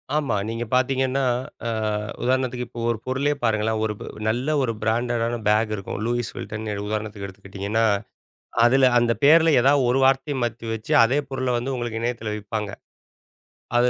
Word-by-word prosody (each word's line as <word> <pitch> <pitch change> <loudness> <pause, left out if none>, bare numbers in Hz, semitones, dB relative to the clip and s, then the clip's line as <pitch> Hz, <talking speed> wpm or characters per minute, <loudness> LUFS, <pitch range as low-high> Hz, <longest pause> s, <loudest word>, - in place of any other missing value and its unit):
ஆமா. 145 -8 +1
நீங்க 115 +1 -3
பார்த்தீங்கன்னா, 130 +1 +1 0.4
ஆ - - 0 0.5
உதாரணத்துக்கு 125 -1 0
இப்போ 120 0 -8
ஒரு 115 - -3
பொருளே 135 +3 +1
பாருங்களேன்! 110 -1 +1
ஒரு 105 - -1
ப் - - -5 0.2
நல்ல 125 +7 0
ஒரு 115 -3 0
பிராண்டட் 120 +1 0
ஆன 120 0 -2
பேக் 110 +1 +2
இருக்கும். 95 0 -6
"லூயிஸ் 120 -1 -1
வில்டன்" 110 +1 -5 0.2
உதாரணத்துக்கு 105 -1 -4
எடுத்துக்கிட்டிங்கன்னா, 100 +3 -2 0.8
அதில 130 +2 +5
அந்த 120 -1 +2
பேருல 160 +3 +7
ஏதாவது 135 +1 +4
ஒரு 130 +2 +2
வார்த்தைய 135 +2 +2
மாத்தி 115 -1 -3
வச்சு 110 -1 -6
அதே 125 +5 +2
பொருள 130 -1 -2
வந்து 130 +3 -2
உங்களுக்கு 120 -2 -3
இணையத்துல 115 -2 -2
விப்பாங்க. 105 0 -4 1.1
அது, 120 +1 +4
120 Hz, 155 wpm, -23 LUFS, 110-130 Hz, 1.1 s, பேருல